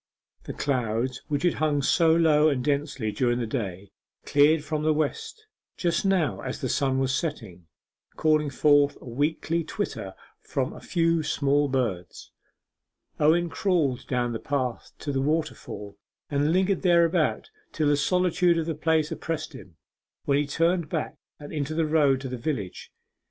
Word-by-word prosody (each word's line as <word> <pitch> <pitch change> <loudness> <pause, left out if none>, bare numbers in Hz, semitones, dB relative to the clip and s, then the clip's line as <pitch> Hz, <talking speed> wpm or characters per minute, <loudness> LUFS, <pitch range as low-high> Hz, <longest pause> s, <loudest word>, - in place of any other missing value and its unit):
The - - -5
clouds 125 -1 -1
which 145 0 -2
had 175 - +3
hung 150 -2 0
so 165 +3 +4
low 155 -2 +4
and 130 -4 -1
densely 140 -6 -1
during 120 +1 0
the 120 - -2
day 100 -5 -5 0.3
cleared 150 +2 +4
from 155 0 -2
the 155 0 +2
west 155 - -3 0.3
just 170 +1 0
now 190 -6 +1
as 130 - -5
the 130 - -3
sun 135 0 +1
was 135 0 0
setting, 110 - -4 0.5
calling 155 -1 +2
forth 145 +1 +3
a - - -14
weakly 155 +6 -1
twitter - - -5 0.3
from - - -2
a - - -11
few 165 -1 +1
small 145 -1 +1
birds. 110 -10 -3 0.9
Owen 165 +3 +3
crawled 165 -8 0
down 120 -2 -1
the 115 - -3
path 130 -4 -3
to 145 - -4
the 135 -1 0
waterfall, 140 -9 -3 0.3
and 145 +2 +1
lingered 190 +2 +1
thereabout 170 - +2 0.2
till 155 -2 0
the 145 - +4
solitude 180 +2 +2
of 165 - -1
the 165 - -2
place 160 +1 +1
oppressed 160 -1 -4
him, 95 - -13 0.5
when 140 0 +2
he 145 - -1
turned 165 +2 +1
back 160 -2 -3 0.2
and 145 +1 -9
into 150 0 -3
the 165 0 +1
road 150 -4 +3
to 135 - -5
the 125 0 -5
village. 120 - -4
145 Hz, 160 wpm, -26 LUFS, 130-160 Hz, 0.9 s, so